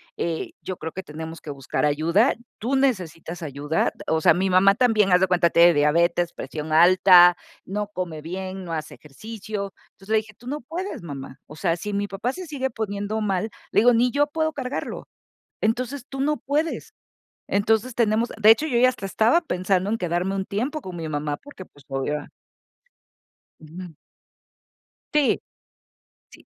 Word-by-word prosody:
eh, 165 -1 -3
yo 185 - -5
creo 160 - -6
que 190 - -6
tenemos 160 +2 -8
que 150 - -10
buscar 140 0 -3
ayuda, 165 - +3 0.3
tú 255 +5 0
necesitas 175 - -1
ayuda." 145 +1 -1 0.2
O 160 0 +1
sea, - - +6
mi 190 +2 0
mamá 185 +2 +5
también, 220 -5 +3
haz 180 - +6
de 190 - +3
cuenta, 175 -2 +3
tiene 170 +1 +6
diabetes, 170 +3 +2
presión 155 0 -6
alta, 175 +1 +7 0.3
no 205 +2 -3
come 180 -6 -5
bien, 185 +3 -6
no 170 - -7
hace 155 -2 -4
ejercicio. 200 +5 -7 0.2
Entonces, 195 +1 -19
le - - +5
dije: 215 0 -4
"Tú 240 +5 -16
no 295 +3 -3
puedes, 350 +10 -5
mamá. 135 -4 -8
O 150 - -13
sea, 165 -1 +1
si 205 +4 -5
mi 200 0 -1
papá 210 +5 -3
se 365 +4 -8
sigue 265 -3 -2
poniendo 210 -1 -3
mal", 210 0 -1 0.2
le - - +4
digo: 245 +2 +6
"Ni 240 +2 +3
yo 290 +2 +2
puedo 315 +1 -1
cargarlo. 265 -2 -5 0.5
Entonces, 250 +4 -1
tú 270 -1 -7
no 300 +2 +1
puedes". 300 +4 -2 0.6
Entonces, 220 +4 +1
tenemos 230 0 +2
de 215 0 +5
hecho, 295 +8 +3
yo 245 -6 0
ya 255 +1 +6
hasta 245 -6 -6
estaba 225 - +3
pensando 185 - 0
en 225 - 0
quedarme 180 +1 -1
un 195 - -1
tiempo 255 +11 -3
con 185 -6 -8
mi 160 - -4
mamá 145 -1 -2
porque, 285 - -12
pues, 145 -5 -22
obvio 135 +2 -3 1.3
Ujú. 165 +2 -10 1.2
Ti 295 -3 +3 0.9
sí. - - -17
195 Hz, 175 wpm, -24 LUFS, 170-235 Hz, 1.3 s, alta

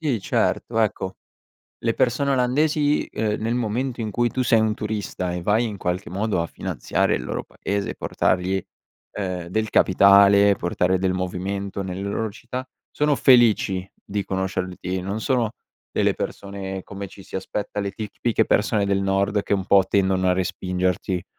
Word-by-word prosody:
Sì, 140 -9 0
certo, 110 +4 0
ecco, 95 -3 -1 0.6
le 115 0 0
persone 130 +3 +1
olandesi, 145 +3 +2
ehm, 105 -1 -1
nel 115 +2 0
momento 120 +2 -2
in 110 -2 -3
cui 120 -1 +1
tu 130 +1 -1
sei 115 -2 +4
un 110 -1 +2
turista 105 -4 -3
e 90 - -3
vai, 105 +6 +2
in 105 -3 -4
qualche 90 +1 -2
modo, 100 -1 0
a 85 - -2
finanziare - - -1
il 60 - -4
loro - - -4
paese 100 0 -3
e - - -9
portargli, 95 +1 0 0.5
ehm, 90 -3 -4
del 110 +4 -1
capitale, 100 +1 +6
portare 90 +1 0
del 95 -1 +1
movimento 95 +2 -3
nelle 95 0 -5
loro 100 +3 -2
città, 125 +4 -7 0.2
sono 150 -1 +2
felici 110 -8 +4
di 100 -1 -3
conoscerti. 95 -1 -3
Non 100 +4 -4
sono 120 -3 +1 0.4
delle - - +1
persone 95 -1 -5
come 100 0 -7
ci 95 +1 -13
si - - -5
aspetta, 105 +2 -4
le 100 -1 -2
tic 105 +1 -6
tipiche 115 -2 +1
persone 105 -1 +2
del 100 0 +1
nord 100 +1 +1
che, - - 0
un 95 -2 0
po', 95 0 +5
tendono 95 -1 +2
a 90 - +4
respingerti. 90 0 -1
100 Hz, 170 wpm, -23 LUFS, 95-110 Hz, 0.6 s, capitale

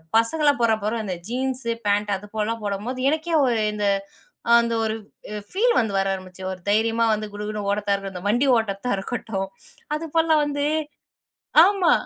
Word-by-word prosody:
பசங்கள்லாம் 285 +4 +3
போdறான் 220 -2 +2
பாரு 215 +3 0
அந்த 185 -3 -3
ஜீன்ஸு, 255 0 -2
பேன்ட் 205 0 +1
அதுபோலலாம் 215 +2 -3
போடும்போது, 210 +6 -3
எனக்கே 315 +2 -1
ஒரு 240 -3 +2 0.2
இந்த 210 -1 -2 0.8
அந்த 235 0 -1
ஒரு 220 0 -1 0.4
அ 210 - -3
ஃபீல் 470 +5 +2
வந்து 215 -4 0
வர 195 - +1
ஆரம்பிச்சுரும். 185 0 -6
ஒரு 185 - -11
தைரியமா 225 +2 +2
வந்து 215 0 -3
குடுகுடுன்னு 210 -1 -4
ஓடத்தா 205 0 0
இருக்கட்டும், 195 -1 -6
இந்த 185 - -4
வண்டி 245 +6 +2
ஓட்டத்தா 215 +1 -2
இருக்கட்டும். 195 -3 -3 0.5
அதுபோலலாம் 320 -1 +2
வந்து 285 0 -1 1.0
ஆமா. 390 -3 +3
220 Hz, 155 wpm, -23 LUFS, 205-260 Hz, 1.0 s, பசங்கள்லாம்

